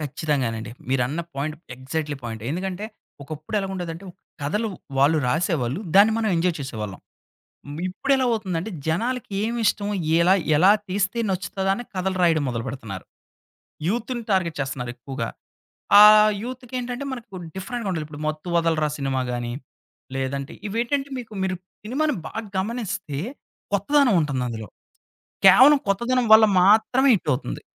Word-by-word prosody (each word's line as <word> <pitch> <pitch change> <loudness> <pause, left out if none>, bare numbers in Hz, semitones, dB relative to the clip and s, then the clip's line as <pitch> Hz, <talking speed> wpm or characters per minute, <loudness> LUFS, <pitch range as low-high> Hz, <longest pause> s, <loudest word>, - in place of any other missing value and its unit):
ఖచ్చితంగానండి. 135 -7 -2 0.2
మీరన్న 135 +5 0
point, 155 +3 -3 0.2
exactly 145 +2 -3
point. 110 -2 -6
ఎందుకంటే 185 +4 -3 0.4
ఒకప్పుడు 155 +7 -5
ఎలాగుండేదంటే, 185 -2 -5 0.4
కథలు 210 +10 -1 0.3
వాళ్ళు 150 +3 +4
రాసేవాళ్ళు. 155 - 0
దాన్ని 210 +3 +7
మనం 220 -1 0
ఎంజాయ్ 170 0 +1
చేసేవాళ్ళం. 105 -7 -6 0.9
ఇప్పుడు 190 +9 -3
ఎలా 260 - +1
అవుతుందంటే, 200 -2 -2 0.2
జనాలకి 230 +7 -1
ఏం 230 +2 -1
ఇష్టము? 205 0 +1 0.3
ఎలా 180 +3 +5 0.2
ఎలా 190 +5 +6 0.2
తీస్తే 200 +4 0
నచ్చుతదా 190 +1 -1
అని 245 - -6
కథలు 185 0 -1
రాయడం 165 -4 +3
మొదలుపెడతన్నారు. 115 -5 -5 0.8
యూత్‍ని 240 +2 -2
టార్గెట్ 180 -4 +1
చేస్తున్నారు 130 -3 -3
ఎక్కువగా. 120 -1 -5 0.7
ఆ - - +12 0.4
యూత్‍కి 255 0 -8
ఏంటంటే 245 +3 -4
మనకు 230 -6 -9 0.2
డిఫరెంట్‍గా 225 +2 -4
ఉండాలి. 160 -3 -3
ఇప్పుడు 150 0 -9
'మత్తు 155 +3 -4
వదలరా' 160 -3 +1
సినిమాగాని, 125 -3 -2 0.6
లేదంటే 135 +1 -3
ఇవేంటంటే 240 +6 -1
మీకు 225 -3 -8
మీరు 185 -1 -1 0.3
సినిమాను 295 +6 0
బాగా 225 0 -5
గమనిస్తే, 210 - -3 0.5
కొత్తదనం 250 +4 +3
ఉంటుందందులో. 125 -6 -3 0.8
కేవలం 260 +10 +8
కొత్తదనం 235 +5 +1
వల్ల 220 0 +9 0.2
మాత్రమే 225 +7 +4
హిట్ 180 - -3
అవుతుంది. - - -3
180 Hz, 125 wpm, -23 LUFS, 140-220 Hz, 0.9 s, ఆ